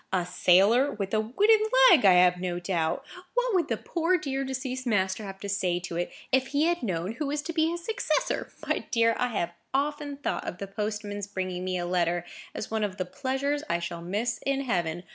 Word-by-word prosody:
A 185 Hz, -2 st, +1 dB
sailor,—with 195 Hz, +5 st, +3 dB
a 215 Hz, -, +3 dB
wooden 405 Hz, -, +3 dB, 0.3 s
leg, 285 Hz, -, +6 dB
I 190 Hz, -, +8 dB
have 180 Hz, 0 st, +5 dB
no 180 Hz, -1 st, -3 dB
doubt. 170 Hz, -3 st, -1 dB, 0.3 s
What -, -, +1 dB
would 360 Hz, -3 st, +2 dB
the -, -, -1 dB
poor, 345 Hz, +2 st, 0 dB
dear, 275 Hz, -4 st, -2 dB
deceased 260 Hz, -1 st, -4 dB
master 190 Hz, -2 st, +1 dB
have 195 Hz, -1 st, -7 dB
said 180 Hz, -3 st, 0 dB
to 170 Hz, -2 st, -5 dB
it, 175 Hz, +1 st, -2 dB, 0.2 s
if 265 Hz, 0 st, +3 dB
he 290 Hz, +2 st, +1 dB
had 345 Hz, +1 st, +1 dB
known 185 Hz, -4 st, -2 dB
who 280 Hz, +6 st, -3 dB
was 290 Hz, +1 st, -2 dB
to 335 Hz, -, -4 dB
be 320 Hz, 0 st, +2 dB
his 340 Hz, 0 st, -5 dB
successor! -, -, -1 dB, 0.2 s
My -, -, +1 dB
dear, 230 Hz, -1 st, +3 dB
I 250 Hz, -, +2 dB
have 175 Hz, -8 st, -2 dB, 0.2 s
often 290 Hz, 0 st, -1 dB
thought 285 Hz, -, -3 dB
of -, -, -4 dB
the 200 Hz, -, -5 dB
postman's 205 Hz, 0 st, -4 dB
bringing 185 Hz, -2 st, -4 dB
me 185 Hz, 0 st, -1 dB
a 175 Hz, -, -2 dB
letter 175 Hz, -1 st, 0 dB, 0.3 s
as 215 Hz, -, -5 dB
one 220 Hz, -1 st, 0 dB
of 200 Hz, -2 st, -3 dB
the 185 Hz, -, -2 dB
pleasures 270 Hz, +8 st, -2 dB
I -, -, +2 dB
shall 170 Hz, 0 st, -5 dB
miss 210 Hz, +7 st, -2 dB
in 275 Hz, 0 st, 0 dB
heaven. 175 Hz, -9 st, -1 dB
215 Hz, 210 wpm, -27 LUFS, 180-275 Hz, 0.3 s, I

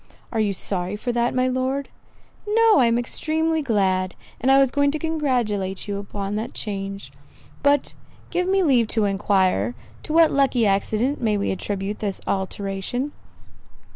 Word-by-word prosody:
"Are 225 Hz, -, -1 dB
you 210 Hz, -2 st, +2 dB
sorry 185 Hz, 0 st, -3 dB
for 245 Hz, +4 st, -3 dB
that, 240 Hz, +1 st, 0 dB
my 255 Hz, 0 st, +2 dB
Lord?" 260 Hz, +2 st, -1 dB, 0.6 s
"No, 445 Hz, -3 st, +5 dB
I 245 Hz, -, +5 dB
am 230 Hz, 0 st, +2 dB
extremely 315 Hz, +6 st, 0 dB
glad; 190 Hz, -7 st, +1 dB, 0.2 s
and 260 Hz, -, +1 dB
I 270 Hz, -, +7 dB
was 270 Hz, -2 st, +4 dB
going 285 Hz, 0 st, +2 dB
to 300 Hz, -, -1 dB
congratulate 245 Hz, -, -1 dB
you 200 Hz, -1 st, -2 dB
upon 200 Hz, 0 st, -4 dB
the 220 Hz, +2 st, -2 dB
change. 195 Hz, -, -5 dB, 0.5 s
But 285 Hz, -1 st, +2 dB, 0.4 s
give 360 Hz, 0 st, 0 dB
me 385 Hz, 0 st, +3 dB
leave 250 Hz, -8 st, +3 dB
to 215 Hz, -, +4 dB
enquire, 190 Hz, -, +1 dB, 0.3 s
to -, -, -6 dB
what 325 Hz, 0 st, +5 dB
lucky 270 Hz, -4 st, +2 dB
accident 215 Hz, +7 st, 0 dB
we 215 Hz, -3 st, +1 dB
may 200 Hz, -, -1 dB
attribute 195 Hz, +2 st, -3 dB
this 200 Hz, -3 st, -2 dB
alteration?" 195 Hz, +7 st, -2 dB
230 Hz, 160 wpm, -23 LUFS, 195-280 Hz, 0.6 s, I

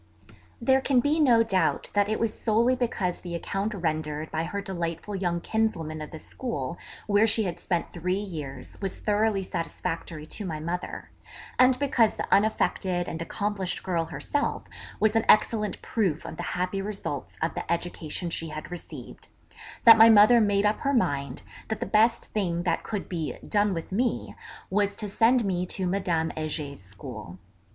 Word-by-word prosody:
There 265 Hz, +3 st, +3 dB
can 265 Hz, -1 st, +3 dB
be 290 Hz, +5 st, +2 dB
no 240 Hz, -6 st, +5 dB
doubt 195 Hz, -5 st, 0 dB
that 205 Hz, 0 st, +2 dB
it 220 Hz, -, 0 dB
was 225 Hz, -2 st, 0 dB
solely 235 Hz, +3 st, +2 dB
because 210 Hz, -8 st, -1 dB
the 175 Hz, -1 st, -5 dB
account 200 Hz, +5 st, -2 dB
rendered 155 Hz, -3 st, -2 dB
by 160 Hz, +1 st, -1 dB
her 200 Hz, +4 st, -3 dB
delightful 175 Hz, 0 st, -4 dB
young 175 Hz, -3 st, -1 dB
kinswoman 165 Hz, -9 st, -1 dB
of 155 Hz, -, -6 dB
the 160 Hz, -, -8 dB
school 155 Hz, -, -5 dB, 0.3 s
where 205 Hz, +1 st, +4 dB
she 220 Hz, +1 st, +3 dB
had 180 Hz, -4 st, -3 dB
spent 175 Hz, -2 st, -2 dB
three 180 Hz, +2 st, -1 dB
years 155 Hz, -10 st, -6 dB
was 195 Hz, -2 st, -3 dB
thoroughly 210 Hz, -1 st, +1 dB
satisfactory 165 Hz, -3 st, -4 dB
to 205 Hz, -, -4 dB
my 160 Hz, -5 st, -4 dB
mother, 170 Hz, +3 st, -5 dB, 0.5 s
and 255 Hz, 0 st, +6 dB
because 255 Hz, -5 st, +2 dB
the -, -, -3 dB
unaffected 190 Hz, -4 st, +1 dB
and 165 Hz, -, -4 dB
accomplished 200 Hz, +1 st, -2 dB
girl 170 Hz, -3 st, 0 dB
herself 285 Hz, -, -2 dB, 0.3 s
was 220 Hz, 0 st, +3 dB
an 225 Hz, -, +3 dB
excellent 215 Hz, 0 st, +4 dB
proof 185 Hz, -9 st, -1 dB
of -, -, -7 dB
the -, -, -4 dB, 0.2 s
happy 185 Hz, +2 st, -1 dB
results 195 Hz, -8 st, -5 dB
of 160 Hz, -, -1 dB
the -, -, -4 dB
education 170 Hz, 0 st, -3 dB
she 165 Hz, -, -3 dB
had 155 Hz, +2 st, -7 dB
received, 175 Hz, -, -9 dB, 0.6 s
that 225 Hz, -1 st, +9 dB
my 225 Hz, +1 st, +10 dB
mother 225 Hz, +2 st, +7 dB
made 205 Hz, -1 st, +2 dB
up 210 Hz, +1 st, +2 dB
her 280 Hz, 0 st, 0 dB
mind 140 Hz, -, 0 dB, 0.2 s
that 220 Hz, -1 st, -3 dB
the 240 Hz, -, -2 dB
best 225 Hz, +2 st, +3 dB
thing 175 Hz, -5 st, 0 dB
that 175 Hz, -, 0 dB
could 210 Hz, -3 st, -4 dB
be 165 Hz, -4 st, -3 dB
'done 205 Hz, -1 st, +2 dB
with 165 Hz, -1 st, -4 dB
me,' 235 Hz, +5 st, -1 dB, 0.4 s
was 205 Hz, 0 st, +1 dB
to 210 Hz, -, -4 dB
send 230 Hz, +3 st, +3 dB
me 180 Hz, -2 st, 0 dB
to 185 Hz, +1 st, -2 dB
Madame 175 Hz, -3 st, 0 dB
Heger's 150 Hz, -, -4 dB
school. 100 Hz, -, -8 dB
195 Hz, 175 wpm, -27 LUFS, 165-220 Hz, 0.6 s, my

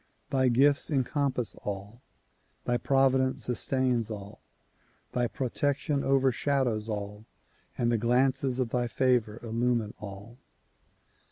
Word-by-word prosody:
Thy 130 Hz, -3 st, +2 dB
gifts 140 Hz, +3 st, +4 dB
encompass 135 Hz, -3 st, 0 dB
all, 105 Hz, +4 st, -6 dB, 0.6 s
thy 120 Hz, -, +1 dB
providence 130 Hz, 0 st, +2 dB
sustains 125 Hz, -2 st, 0 dB
all, 105 Hz, -1 st, -8 dB, 0.7 s
thy 120 Hz, -1 st, +1 dB
protection 140 Hz, +3 st, -1 dB
overshadows 130 Hz, -4 st, +1 dB
all 105 Hz, 0 st, -5 dB, 0.5 s
and 120 Hz, -1 st, +1 dB
the 115 Hz, -, +1 dB
glances 130 Hz, +2 st, +2 dB
of 130 Hz, -3 st, 0 dB
thy 120 Hz, +1 st, 0 dB
favor 120 Hz, -3 st, +1 dB
illumine 115 Hz, -1 st, 0 dB
all. 105 Hz, +4 st, -9 dB
125 Hz, 105 wpm, -29 LUFS, 115-135 Hz, 0.7 s, gifts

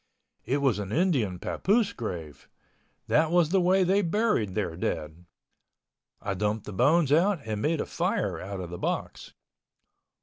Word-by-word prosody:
It 140 Hz, +3 st, 0 dB
was 130 Hz, -6 st, +2 dB
an 100 Hz, -1 st, -5 dB
Indian 135 Hz, -, +1 dB
papoose 200 Hz, -, 0 dB
grave—that 85 Hz, -, -4 dB
was 170 Hz, -2 st, +3 dB
the 190 Hz, +1 st, +3 dB
way 185 Hz, +2 st, +4 dB
they 190 Hz, +3 st, +3 dB
buried 170 Hz, -, 0 dB
their 95 Hz, -6 st, -2 dB
dead. 80 Hz, -1 st, -4 dB, 0.9 s
I 100 Hz, -, -3 dB
dumped 105 Hz, +2 st, -2 dB
the 105 Hz, -, -7 dB
bones 145 Hz, -, +3 dB
out 175 Hz, +4 st, +3 dB
and 105 Hz, -2 st, -3 dB
made 155 Hz, +3 st, +1 dB
a -, -, -1 dB
fire -, -, -1 dB
out 100 Hz, 0 st, -6 dB
of 90 Hz, -1 st, -7 dB
the 90 Hz, -, -6 dB
box. -, -, -4 dB
125 Hz, 155 wpm, -27 LUFS, -, 0.9 s, way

